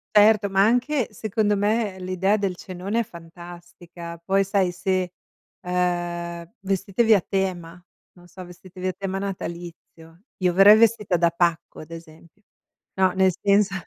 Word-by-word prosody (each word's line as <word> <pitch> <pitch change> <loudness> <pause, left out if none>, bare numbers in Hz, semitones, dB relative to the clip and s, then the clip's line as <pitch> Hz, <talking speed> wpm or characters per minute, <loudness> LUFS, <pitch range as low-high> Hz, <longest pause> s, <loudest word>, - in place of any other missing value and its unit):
Certo, 210 -1 +5
ma 195 +1 +3
anche, 250 +3 +1
secondo 210 0 0
me, 205 -1 0
l'idea 185 +3 0
del 195 -4 -2
cenone 190 +5 -4
è - - +1
fantastica. 175 0 -11
Poi 195 +2 +1
sai, 190 -2 0
se, 185 -1 -2 0.5
ehm, 175 -1 -3
vestitevi 195 +3 +1
a 195 - +4
tema, 180 -3 -3 0.4
non 175 - -17
so, 185 +2 -11
vestitevi 185 +1 -9
a - - 0
tema 195 -1 -4
natalizio. 170 -2 -8 0.2
Io 180 - +3
verrei 195 +4 +7
vestita 220 -4 +2
da 170 0 +3
pacco 170 -1 -1
ad 155 +1 -12
esempio 165 +3 -13 0.5
no, 190 -1 +3
nel 190 0 +3
senso 200 0 +3
185 Hz, 145 wpm, -23 LUFS, 175-200 Hz, 0.5 s, verrei